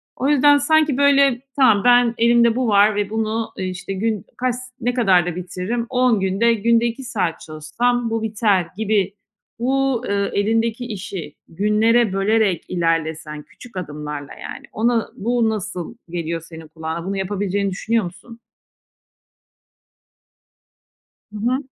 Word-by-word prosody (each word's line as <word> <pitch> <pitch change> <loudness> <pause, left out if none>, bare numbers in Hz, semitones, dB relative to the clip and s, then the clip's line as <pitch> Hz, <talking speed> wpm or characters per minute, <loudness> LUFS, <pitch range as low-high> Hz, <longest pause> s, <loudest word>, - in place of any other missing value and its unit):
O 270 - -1
yüzden, 290 0 +5
sanki, 305 -1 +2
böyle, 280 -3 +4
tamam 225 -8 +4
ben 245 -1 +5
elimde 235 0 +4
bu 255 -1 0
var 205 0 +4
ve 205 -1 -1
bunu, 220 +1 -2
eee, 190 - -3
işte, 185 +1 -6
gün 210 0 -2
kaç 250 -1 0
s 245 - -7 0.2
ne 245 +1 0
kadar 190 -8 +3
da 175 -2 -3
bitiririm? 185 +6 -3
10 250 -4 +2
günde, 195 +5 +2
günde 230 +2 +2
2 235 +3 -3
saat 195 -9 -2
çalışsam 230 +11 -1
bu 225 0 -2
biter 210 -5 +1
gibi. 205 -3 0 0.5
Bu, 265 0 0
eee, 200 0 0
elindeki 225 +3 0
işi 190 -8 -6
günlere 210 +4 +2
bölerek 195 -2 +1
ilerlesen, 160 -3 -2
küçük 210 +7 -14
adımlarla 150 -4 -6
yani, - - -9
ona, 230 0 +1
bu 235 +1 +1
nasıl 210 -2 -5
geliyor 170 -1 -3
senin 165 -1 -11
kulağına? 160 +2 -6
Bunu 195 +1 -3
yapabileceğini 200 0 -1
düşünüyor 225 +3 0
musun? 230 +7 -11 2.9
Hı - - -9
hı. 245 +4 +1
215 Hz, 140 wpm, -20 LUFS, 185-235 Hz, 2.9 s, yüzden